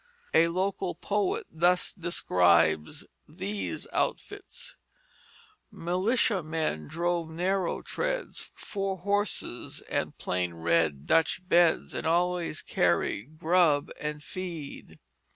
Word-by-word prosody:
A 165 Hz, +1 st, +6 dB
local 185 Hz, +1 st, -1 dB
poet 205 Hz, -2 st, -1 dB
thus 175 Hz, +3 st, +2 dB
describes 85 Hz, -, +2 dB, 0.2 s
these 195 Hz, +6 st, -4 dB
outfits: 415 Hz, +5 st, -3 dB, 0.9 s
"Militia 195 Hz, +2 st, +1 dB
men 155 Hz, -, -2 dB
drove 170 Hz, -1 st, -1 dB
narrow 180 Hz, +2 st, -1 dB
treads, -, -, -3 dB
Four 195 Hz, -2 st, -3 dB
horses 200 Hz, -, -1 dB
and -, -, -3 dB
plain 90 Hz, -2 st, -2 dB
red 80 Hz, -4 st, +1 dB
Dutch 165 Hz, +3 st, +2 dB
beds, 175 Hz, -2 st, +4 dB
And -, -, -3 dB
always 175 Hz, -1 st, +1 dB
carried 140 Hz, +10 st, 0 dB
grub 160 Hz, -3 st, +3 dB
and 150 Hz, 0 st, -4 dB
feed." 170 Hz, -6 st, -6 dB
170 Hz, 100 wpm, -29 LUFS, 150-190 Hz, 0.9 s, A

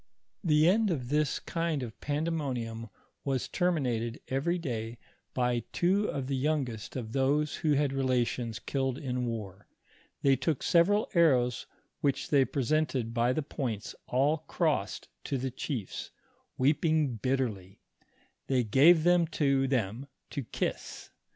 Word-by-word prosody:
The 155 Hz, -2 st, +4 dB
end 210 Hz, +3 st, +4 dB
of 130 Hz, -8 st, -2 dB
this 150 Hz, 0 st, +1 dB
kind 165 Hz, -5 st, -2 dB
of 115 Hz, -3 st, -8 dB
pandemonium 135 Hz, -7 st, -2 dB, 0.3 s
was 135 Hz, -3 st, -1 dB
termin 175 Hz, -6 st, +1 dB
ated 115 Hz, 0 st, -2 dB
every 145 Hz, +7 st, 0 dB
day 115 Hz, -7 st, -4 dB, 0.4 s
by 125 Hz, -1 st, +1 dB
two 195 Hz, +4 st, +2 dB
of 135 Hz, -, -3 dB
the 135 Hz, +1 st, -1 dB
youngest 130 Hz, -6 st, -2 dB
of 115 Hz, -4 st, -4 dB
those 140 Hz, +3 st, +1 dB
who 155 Hz, -3 st, +1 dB
had 145 Hz, -1 st, +2 dB
had -, -, -5 dB
relations 125 Hz, -4 st, 0 dB
killed 135 Hz, -2 st, -2 dB
in 125 Hz, -4 st, -2 dB
war; 105 Hz, -4 st, -6 dB, 0.6 s
they 135 Hz, -1 st, +5 dB
took 135 Hz, +2 st, -1 dB
several 200 Hz, +5 st, +4 dB
arrows 125 Hz, -8 st, +3 dB, 0.3 s
which 140 Hz, -2 st, -1 dB
they 140 Hz, -3 st, +5 dB
presented 135 Hz, -4 st, 0 dB
by 120 Hz, +1 st, +2 dB
the 155 Hz, +4 st, -1 dB
points 120 Hz, -7 st, -4 dB
all 140 Hz, +5 st, +2 dB
crossed 150 Hz, -, -1 dB, 0.2 s
to 140 Hz, -, -1 dB
the 130 Hz, +1 st, -3 dB
chiefs, 120 Hz, -5 st, -4 dB, 0.5 s
weeping 150 Hz, -1 st, +2 dB
bit 130 Hz, +5 st, 0 dB
terly; 95 Hz, -7 st, -4 dB, 0.7 s
they 130 Hz, -2 st, +2 dB
gave 150 Hz, +9 st, +6 dB
them 175 Hz, -1 st, +4 dB
to 140 Hz, -4 st, +1 dB
them 125 Hz, 0 st, -1 dB, 0.2 s
to 140 Hz, -, -3 dB
kiss. -, -, -4 dB
135 Hz, 145 wpm, -30 LUFS, 120-155 Hz, 0.7 s, gave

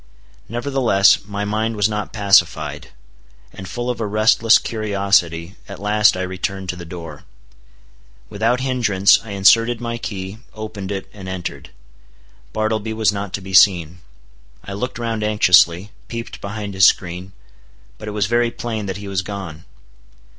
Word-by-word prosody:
Nevertheless, 120 Hz, -6 st, +2 dB
my 100 Hz, 0 st, -4 dB
mind 110 Hz, +2 st, -1 dB
was 105 Hz, -1 st, +2 dB
not 105 Hz, -1 st, -4 dB
pacified; 80 Hz, -8 st, +2 dB, 0.7 s
and 95 Hz, -, -9 dB
full 120 Hz, 0 st, -4 dB
of 125 Hz, -2 st, -3 dB
a 110 Hz, -, -1 dB
restless 110 Hz, +2 st, +4 dB
curiosity, 100 Hz, -5 st, 0 dB
at 100 Hz, -, -7 dB
last 105 Hz, 0 st, +3 dB
I 95 Hz, -, -2 dB
returned 95 Hz, +1 st, -4 dB
to 90 Hz, -, -2 dB
the 85 Hz, -1 st, -9 dB
door. 80 Hz, -3 st, -9 dB, 1.0 s
Without 115 Hz, -, 0 dB
hindrance 115 Hz, -7 st, +3 dB
I 115 Hz, -, -11 dB
inserted 115 Hz, +4 st, +4 dB
my 120 Hz, -1 st, -4 dB
key, 95 Hz, -1 st, -6 dB, 0.2 s
opened 105 Hz, -3 st, -6 dB
it, 95 Hz, -1 st, -4 dB
and 95 Hz, -3 st, -9 dB
entered. 95 Hz, -2 st, -6 dB, 0.8 s
Bartleby 110 Hz, 0 st, -2 dB
was 110 Hz, -3 st, +2 dB
not 100 Hz, -1 st, -5 dB
to 100 Hz, -, -3 dB
be 95 Hz, 0 st, -9 dB
seen. 90 Hz, -3 st, +4 dB, 0.6 s
I 100 Hz, -, -7 dB
looked 125 Hz, +6 st, -4 dB
round 115 Hz, -2 st, -3 dB
anxiously, 95 Hz, -2 st, +4 dB, 0.2 s
peeped 115 Hz, 0 st, -7 dB
behind 100 Hz, 0 st, -5 dB
his 95 Hz, -1 st, +6 dB
screen; 90 Hz, +1 st, -1 dB, 0.7 s
but 105 Hz, -, -9 dB
it 105 Hz, 0 st, -5 dB
was 100 Hz, -, +2 dB
very 120 Hz, +3 st, +1 dB
plain 110 Hz, -3 st, -5 dB
that 95 Hz, 0 st, -4 dB
he 100 Hz, 0 st, -8 dB
was 95 Hz, -2 st, -1 dB
gone. 90 Hz, -5 st, -7 dB
100 Hz, 155 wpm, -20 LUFS, 95-110 Hz, 1.0 s, his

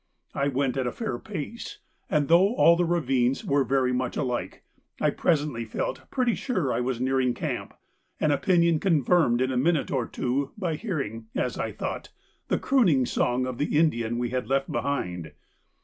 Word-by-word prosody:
I 140 Hz, -, 0 dB
went 135 Hz, -1 st, 0 dB
at 130 Hz, -2 st, 0 dB
a -, -, -1 dB
fair 225 Hz, -2 st, -4 dB
pace, 220 Hz, -, -6 dB, 0.3 s
and 150 Hz, -2 st, +1 dB
though 185 Hz, +7 st, +5 dB
all 170 Hz, -, +6 dB
the 175 Hz, +1 st, +1 dB
ravines 135 Hz, -7 st, +1 dB
were 140 Hz, 0 st, +2 dB
very 130 Hz, -1 st, +1 dB
much 125 Hz, 0 st, -2 dB
alike, 125 Hz, -4 st, -3 dB, 0.4 s
I -, -, +2 dB
presently 145 Hz, -7 st, 0 dB
felt 110 Hz, -, -4 dB
pretty 250 Hz, -3 st, +1 dB
sure 185 Hz, -, -1 dB
I -, -, 0 dB
was 125 Hz, -1 st, -2 dB
nearing 130 Hz, -1 st, +1 dB
camp, -, -, -4 dB, 0.4 s
an 155 Hz, -, +2 dB
opinion 170 Hz, +1 st, +3 dB
confirmed 155 Hz, -7 st, +3 dB
in 130 Hz, 0 st, +1 dB
a 130 Hz, -, -1 dB
minute 155 Hz, +2 st, +1 dB
or 130 Hz, -4 st, 0 dB
two 135 Hz, +2 st, -2 dB
by 180 Hz, -6 st, -1 dB
hearing, 140 Hz, -, -4 dB
as 125 Hz, -3 st, -1 dB
I 110 Hz, -, -2 dB
thought, -, -, -5 dB, 0.4 s
the -, -, +1 dB
crooning 180 Hz, -, +3 dB
song 125 Hz, +1 st, 0 dB
of 130 Hz, -1 st, -5 dB
the 145 Hz, 0 st, 0 dB
Indian 120 Hz, -7 st, +1 dB
we 120 Hz, 0 st, -2 dB
had 125 Hz, 0 st, -2 dB
left 135 Hz, 0 st, 0 dB
behind. 90 Hz, -, -3 dB
135 Hz, 180 wpm, -26 LUFS, 125-170 Hz, 0.4 s, all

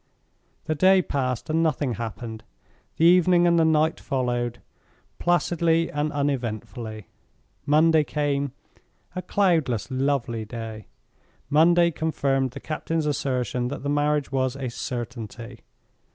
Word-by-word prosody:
The 155 Hz, -, 0 dB
day 185 Hz, +4 st, +4 dB
passed 130 Hz, -4 st, -2 dB
and 160 Hz, +1 st, +2 dB
nothing 150 Hz, -5 st, 0 dB
happened; 110 Hz, 0 st, -6 dB, 0.5 s
the 165 Hz, -, +3 dB
evening 175 Hz, 0 st, +5 dB
and 170 Hz, -1 st, +4 dB
the -, -, +5 dB
night 160 Hz, 0 st, +2 dB
followed, 120 Hz, -3 st, -2 dB, 0.6 s
placidly 170 Hz, -1 st, +1 dB
and 150 Hz, +1 st, -1 dB
uneventfully. 115 Hz, -6 st, -3 dB, 0.6 s
Monday 155 Hz, +1 st, +5 dB
came, 145 Hz, -2 st, -1 dB, 0.6 s
a 185 Hz, -, -2 dB
cloudless, 165 Hz, -, +1 dB
lovely 130 Hz, -4 st, -1 dB
day; 110 Hz, -1 st, -7 dB, 0.6 s
Monday 170 Hz, +3 st, +5 dB
confirmed 140 Hz, -5 st, 0 dB
the -, -, -7 dB
captain's 160 Hz, 0 st, -2 dB
assertion 130 Hz, -4 st, -1 dB
that 135 Hz, +1 st, -6 dB
the 145 Hz, -, -2 dB
marriage 145 Hz, -1 st, +1 dB
was 130 Hz, -1 st, 0 dB
a 130 Hz, -3 st, -4 dB
certainty. 120 Hz, -2 st, -6 dB
140 Hz, 120 wpm, -25 LUFS, 120-160 Hz, 0.6 s, evening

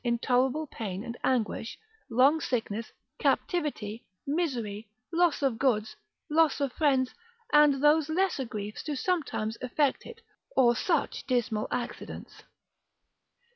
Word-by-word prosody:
Intolerable 250 Hz, +5 st, +1 dB
pain 205 Hz, -8 st, -5 dB
and 235 Hz, -, -6 dB
anguish, 235 Hz, -3 st, 0 dB, 0.3 s
long 265 Hz, +7 st, +4 dB
sickness, 225 Hz, -3 st, -2 dB, 0.3 s
captivity, 260 Hz, -, -1 dB, 0.2 s
misery, 240 Hz, -10 st, -2 dB, 0.2 s
loss 340 Hz, -3 st, +2 dB
of 250 Hz, -5 st, +1 dB
goods, 220 Hz, -6 st, +1 dB, 0.3 s
loss 315 Hz, -2 st, +3 dB
of 280 Hz, -3 st, -1 dB
friends, 265 Hz, -4 st, +2 dB, 0.4 s
and 295 Hz, -2 st, +5 dB
those 300 Hz, +1 st, +4 dB
lesser 340 Hz, -5 st, +1 dB
griefs, 210 Hz, -2 st, -5 dB
do 300 Hz, -2 st, -3 dB
sometimes 265 Hz, -9 st, -1 dB
effect 265 Hz, +3 st, 0 dB
it, 460 Hz, -, -10 dB, 0.4 s
or 240 Hz, -2 st, +5 dB
such 330 Hz, +1 st, -1 dB
dismal 240 Hz, -4 st, 0 dB
accidents. 245 Hz, -1 st, -5 dB
260 Hz, 115 wpm, -29 LUFS, 230-300 Hz, 0.4 s, and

